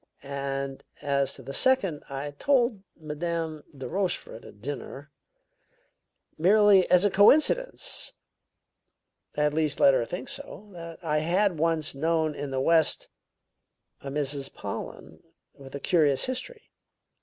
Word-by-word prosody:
"And 140 -1 -4 0.2
as 140 -2 +1
to 135 - -10
the 135 +2 -7
second, 195 - +2
I 140 +1 -5
told 240 - +1 0.2
Madame 160 0 -4
de 135 - -6
Rochefort 185 - -3
at 100 - -14
dinner 140 +3 -7 1.3
merely 200 +1 +5
as 180 +2 +5
a 205 - +3
coincidence; 400 - +3 1.3
at 150 0 +2
least, 155 -2 0
I - - +2
let 140 - +7
her 120 - +1
think 180 - -6
so 275 -6 -8
that 165 -1 -9
I 150 -2 +1
had 175 +2 +1
once 160 -1 0
known 160 +2 0
in 145 -1 -5
the 135 -1 -2
West 160 +3 +2 0.9
a 140 - -7
Mrs. 140 -1 -2
Pollen - - -7 0.3
with 135 0 -12
a - - -4
curious 150 -4 +2
history. 255 - -6
155 Hz, 130 wpm, -27 LUFS, 140-190 Hz, 1.3 s, let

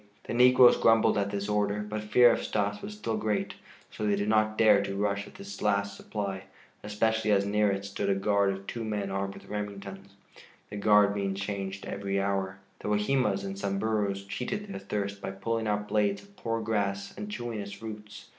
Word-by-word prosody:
The - - -5
negroes 125 +1 +7
grumbled 115 0 +4
at 100 0 0
this 100 0 -3
order, 105 0 0
but 105 +1 -4
fear 120 +3 +6
of - - 0
Stas 100 0 -1
was 105 - -7
still 110 +1 -2
great; 105 -1 -1 0.4
so - - -6
they 105 -1 +2
did 100 +1 -1
not 110 0 +2
dare 105 -3 +6
to 100 0 -4
rush 100 0 -1
at - - -15
this 195 +1 -9
last 100 0 +1
supply, 100 -2 -5 0.4
especially 110 +1 0
as 100 -1 +3
near 105 +1 +2
it 100 0 -3
stood 100 0 -2
a 100 - +3
guard 100 0 +2
of 95 0 -6
two 115 +2 -5
men 105 -3 -2
armed 100 0 -2
with - - -13
Remingtons, 100 -1 -6 0.6
the 105 - -5
guard 105 0 +5
being 100 -1 -1
changed 100 0 -4
every 100 0 -2
hour. 95 -1 -1 0.2
The - - -6
Wahimas 105 0 +1
and 100 0 -4
Samburus 100 0 -1
cheated 200 - -3
their 200 - -6
thirst 100 0 -3
by - - -4
pulling 110 +3 -2
out 105 0 -1
blades 105 -1 +1
of 200 0 -21
poor 115 - -2
grass 100 -2 -2
and 210 - -6
chewing 120 - -4
its 100 0 -7
roots. 105 -1 -9
105 Hz, 200 wpm, -29 LUFS, 100-110 Hz, 0.6 s, negroes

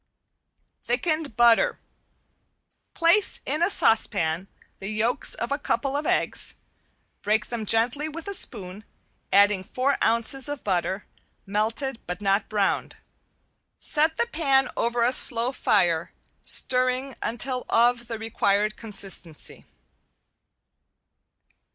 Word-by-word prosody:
~THICKENED 290 0 -2
BUTTER~ 235 -1 +4 1.2
Place 340 +5 +2
in 300 +4 -2
a 345 - +3
saucepan 190 - +3 0.3
the 195 - -7
yolks 220 +3 +1
of 235 - -5
a 285 - -1
couple 280 -1 -2
of 295 +1 -2
eggs. - - +1 0.7
Break 210 +1 0
them 225 -3 -5
gently 240 +8 +1
with 325 +3 -8
a 400 - -3
spoon, 205 - -2 0.5
adding 200 -1 +4
four 260 +8 -1
ounces 235 +4 +1
of 290 -2 -6
butter, 190 +1 -2 0.4
melted 225 +5 -2
but 180 0 -5
not 200 0 0
browned. 205 -2 -1 0.8
Set 315 +2 0
the - - +1
pan 275 - +1
over 235 0 0
a 240 - +2
slow 240 0 +3
fire, 175 -10 +1 0.3
stirring 255 +1 +2
until 250 +2 -2
of 235 0 +2
the 230 - -4
required 215 -1 0
consistency. 195 -7 -6
235 Hz, 115 wpm, -24 LUFS, 205-270 Hz, 1.2 s, BUTTER~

